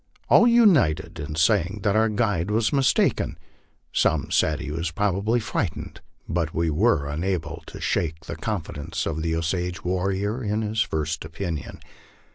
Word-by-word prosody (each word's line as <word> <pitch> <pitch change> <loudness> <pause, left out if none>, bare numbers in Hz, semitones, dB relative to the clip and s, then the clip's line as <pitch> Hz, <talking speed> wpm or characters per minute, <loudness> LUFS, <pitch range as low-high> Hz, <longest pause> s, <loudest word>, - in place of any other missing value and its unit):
All 235 - +7
united 185 - +4
in 75 0 -5
saying 95 +4 +2
that 105 -1 +2
our 110 +1 +3
guide 105 -5 0
was 110 +5 +1
mis 135 -3 +4
taken. - - 0 0.6
Some 80 -3 +1
said 80 0 +2
he 75 -3 -5
was 85 +2 -2
probably 100 +6 0
frightened, 95 -6 -3 0.3
but 85 -1 -2
we 85 -1 +1
were 80 -3 +2
unable 80 +1 -2
to - - -9
shake 80 -1 -1
the - - -5
confidence 80 -9 -4
of 80 -1 -2
the 80 0 0
Osage 90 +2 -2
warrior 95 +6 -1
in 105 +1 -1
his 110 +1 0
first 80 -4 -2
opinion. 80 0 -5
90 Hz, 155 wpm, -24 LUFS, 80-105 Hz, 0.6 s, All